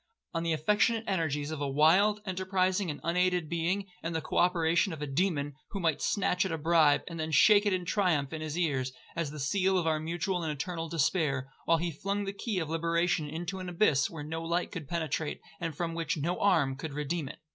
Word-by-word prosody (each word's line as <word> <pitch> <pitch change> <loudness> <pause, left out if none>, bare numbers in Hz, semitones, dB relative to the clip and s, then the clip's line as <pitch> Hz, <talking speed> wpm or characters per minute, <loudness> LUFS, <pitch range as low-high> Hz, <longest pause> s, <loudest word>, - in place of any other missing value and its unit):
On 165 - -1
the 165 0 -1
affectionate 210 +8 +2
energies 160 -6 -1
of 155 -2 -4
a 145 - 0
wild, 185 +9 +4
enterprising, 185 0 0
and 145 - -4
unaided 180 0 +1
being, 170 +5 -1 0.2
and 165 0 -3
the - - +1
co 155 - -4
operation 170 0 +3
of 155 - -8
a - - -1
demon, 145 -1 0 0.2
who 200 - -4
might 165 -4 0
snatch 185 -3 +1
at 190 - -2
a 165 - -1
bribe, 160 -2 +4
and 165 -2 -6
then 160 0 -2
shake 205 +7 +6
it - - +3
in 180 -1 -1
triumph 165 -8 +1
in 160 - -4
his 155 +1 -4
ears, 135 -7 0 0.2
as 165 -3 -1
the 150 +1 -8
seal 190 +6 +1
of 175 - 0
our 160 -1 +1
mutual 175 +3 -2
and 160 -2 -2
eternal 165 +2 -4
despair, 145 -4 0
while 165 - +4
he 170 +1 -2
flung 200 +6 -2
the 195 - -3
key 205 0 -3
of 165 -4 -1
liberation 165 -1 0
into 175 +5 -4
an 185 -1 -5
abyss 170 -7 +2
where 160 -3 -7
no 160 +2 -4
light 170 +2 -1
could 160 -6 -6
penetrate, 160 -2 -2 0.2
and 165 -4 -4
from 170 -1 -2
which 165 -1 -2
no 170 +5 -1
arm 140 -10 +3
could 140 +2 -6
redeem 150 0 -2
it. - - -9
165 Hz, 220 wpm, -30 LUFS, 155-180 Hz, 0.2 s, shake